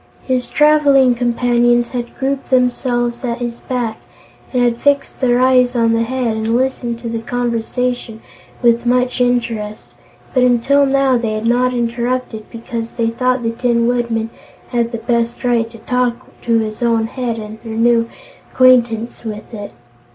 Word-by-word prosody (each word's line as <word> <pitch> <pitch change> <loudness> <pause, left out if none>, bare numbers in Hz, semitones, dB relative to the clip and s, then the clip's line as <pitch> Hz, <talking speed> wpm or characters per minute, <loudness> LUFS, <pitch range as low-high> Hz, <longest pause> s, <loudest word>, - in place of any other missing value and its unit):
His 255 -2 -1
traveling 290 -4 +4
companions 240 0 +2
had 240 -2 -5
grouped 270 0 -2
themselves 245 -1 0
at 235 -2 -2
his 240 -1 -5
back, 240 -4 -3 0.5
and 250 -2 +1
had 240 -1 +1
fixed 285 -1 +1
their 245 -1 +3
eyes 255 -1 +3
on 230 -1 +2
the 230 - +1
Head 240 -1 -1
and 220 +1 -1
listened 250 -2 -1
to 235 - -5
the 230 0 -3
conversation 240 0 -2 0.4
with 235 0 +3
much 250 +1 +1
interest, 230 -4 -1 0.4
but 255 - +3
until 250 +3 +3
now, 270 -2 +2
they 225 -2 -2
had 215 +1 -3
not 250 +2 +2
interrupted 240 -1 -2
because 230 0 -6
they 230 -1 0
thought 255 +1 0
the 230 - 0
Tin 235 0 +1
Woodman 235 -2 -1 0.4
had 235 -2 0
the 230 - -3
best 235 +1 -1
right 235 -2 +1
to 230 - -13
talk 250 +1 0 0.3
to 230 -1 +1
his 215 0 -3
own 230 -2 +2
head 235 0 -3
and 215 0 -8
renew 230 +1 +2 0.4
acquaintance 240 -3 +3
with 215 0 -7
it. 205 -2 -7
240 Hz, 160 wpm, -17 LUFS, 230-250 Hz, 0.5 s, traveling